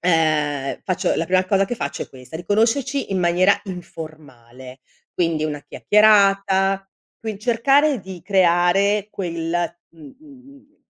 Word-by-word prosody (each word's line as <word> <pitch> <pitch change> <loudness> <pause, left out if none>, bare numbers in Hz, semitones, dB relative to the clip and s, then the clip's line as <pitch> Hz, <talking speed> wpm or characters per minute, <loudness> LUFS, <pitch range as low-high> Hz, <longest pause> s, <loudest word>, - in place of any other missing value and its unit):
ehm, 155 -5 0
faccio, 185 -2 0
la 165 - -1
prima 185 0 +2
cosa 195 +1 +2
che 245 - -3
faccio - - -4
è - - -10
questa, 130 +4 -10
di 175 - -9
conoscerci 235 +7 0
in 190 - 0
maniera 180 +3 +3
informale, 145 -8 -10 0.4
quindi 165 -3 0
una 150 -2 -4
chiacchierata, 195 -2 +3 0.3
qui 220 -3 -5
cercare 265 +4 +2
di 185 -2 -10
creare 190 +2 +2
quel 165 -3 -4 0.4
uhm 155 -4 -15
uhm 275 -3 -17
uhm, 280 +2 -20
185 Hz, 140 wpm, -21 LUFS, 160-210 Hz, 0.4 s, maniera